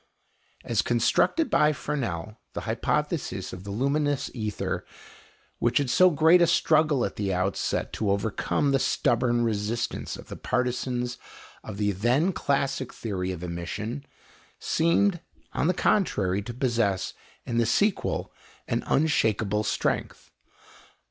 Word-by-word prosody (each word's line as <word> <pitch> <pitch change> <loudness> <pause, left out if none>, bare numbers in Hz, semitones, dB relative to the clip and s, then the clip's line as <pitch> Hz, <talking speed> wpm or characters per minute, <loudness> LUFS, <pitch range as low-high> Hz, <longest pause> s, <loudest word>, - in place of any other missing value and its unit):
As - - +1
constructed 325 -1 +2
by 150 0 +4
Fresnel, 110 - -4
the - - -4
hypothesis - - -2
of 90 +1 -9
the - - -6
luminous 140 +6 0
ether, 110 -4 -3 0.8
which 120 0 +2
had 140 -4 +1
so 185 0 +6
great 160 +2 +5
a 170 - +5
struggle 155 -5 +3
at - - -5
the 100 -2 -1
outset 95 +1 -1
to 105 - -1
overcome 105 +8 0
the 135 - +3
stubborn 120 -1 +1
resistance 115 +1 -2
of - - -12
the - - -7
partisans 125 0 -2 0.4
of 105 -2 -7
the 105 0 +1
then 125 - +2
classic 135 -3 -1
theory 95 -4 -3
of 90 -1 -6
emission, 90 - -4 0.5
seemed, 175 +3 +2 0.3
on - - +1
the - - +4
contrary, 100 - +1
to 105 - -6
possess 115 -7 0 0.3
in 120 0 -1
the 115 - +2
sequel 205 - 0 0.3
an - - -1
unshakable 110 -8 +2
strength. - - -2
120 Hz, 130 wpm, -26 LUFS, 105-145 Hz, 0.8 s, so